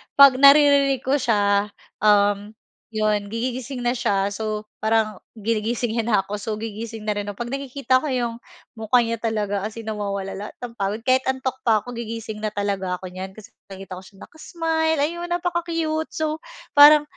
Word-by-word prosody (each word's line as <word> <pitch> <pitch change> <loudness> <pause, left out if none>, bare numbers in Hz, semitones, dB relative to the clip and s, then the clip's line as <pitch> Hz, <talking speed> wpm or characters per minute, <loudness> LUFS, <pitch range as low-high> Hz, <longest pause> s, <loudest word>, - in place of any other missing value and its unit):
'pag 275 -2 +8
naririnig 280 -2 +6
ko 275 +2 +1
siya, 205 -3 +2 0.3
um, 205 0 +3 0.4
'yon 210 -1 +1
gigi 240 +4 -3
gising 255 -1 -6
na 240 - +2
siya. 200 -5 0
So, 215 0 -3 0.2
parang 220 -2 +1 0.2
ginigising 225 +2 -1
niya 225 - -1
na 220 - +3
ako, 205 +1 -5
so 215 +1 -3
gigising 220 +1 -6
na 215 - -1
rin 205 0 -3
ako. 205 - -5
'Pag 240 - -7
nakikita 260 -1 +1
ko 305 - -5
'yong 240 -3 -1 0.4
mukha 230 +1 +2
niya 230 -1 -3
talaga 210 -3 -1
as 220 - -11
in 230 - -7
nawawala 200 -2 -3
lahat 205 +2 -7
ng 235 -1 -8
pagod, 200 +3 -2
kahit 260 +1 +4
antok 260 0 -2
pa 215 -2 +4
ako, 245 - -8
gigising 225 -2 -6
na 215 0 -4
talaga 195 -2 -1
ako 180 0 -9
niyan. 190 +1 -7
Kasi 215 - -13 0.2
nakikita 190 -1 -8
ko - - -14
siya 200 - -17
naka-smile, 320 -1 -1
ayun, 345 +3 -3
napaka-cute. 335 -2 -1
So, 310 0 -1 0.3
parang 295 +1 +8
225 Hz, 180 wpm, -23 LUFS, 205-265 Hz, 0.4 s, pag